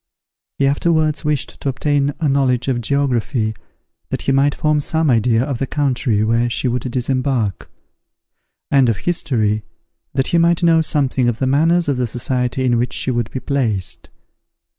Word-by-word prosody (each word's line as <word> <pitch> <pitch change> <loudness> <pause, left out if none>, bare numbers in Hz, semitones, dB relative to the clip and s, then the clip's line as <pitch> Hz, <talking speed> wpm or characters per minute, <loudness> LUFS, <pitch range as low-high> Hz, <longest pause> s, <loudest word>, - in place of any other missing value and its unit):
He 140 - +2
afterwards 155 +2 +1
wished 150 -3 -2
to 140 - -1
obtain 145 +2 0
a 160 - 0
knowledge 135 -3 +1
of 125 -3 0
geography, 120 -4 0 0.6
that - - -3
he - - +1
might 140 +1 +2
form 150 -2 +1
some 160 0 0
idea 115 0 +2
of 135 -3 -3
the 135 - -1
country 125 -7 0
where 115 +2 +1
she 125 - -1
would 125 +1 -2
disembark; 125 -4 -1 1.0
and 135 -3 +4
of 110 - 0
history, 110 -11 0 0.5
that 135 -1 0
he 170 - +3
might 170 +1 +2
know 165 -1 +5
something 135 -5 +1
of 115 - -2
the 130 - -1
manners 165 +6 +2
of 140 -3 0
the 125 -1 0
society 125 +2 -1
in 120 -2 +2
which 125 +1 -1
she 130 - -2
would 120 -2 -1
be 130 - -5
placed. 115 - -2
130 Hz, 170 wpm, -18 LUFS, 120-145 Hz, 1.0 s, know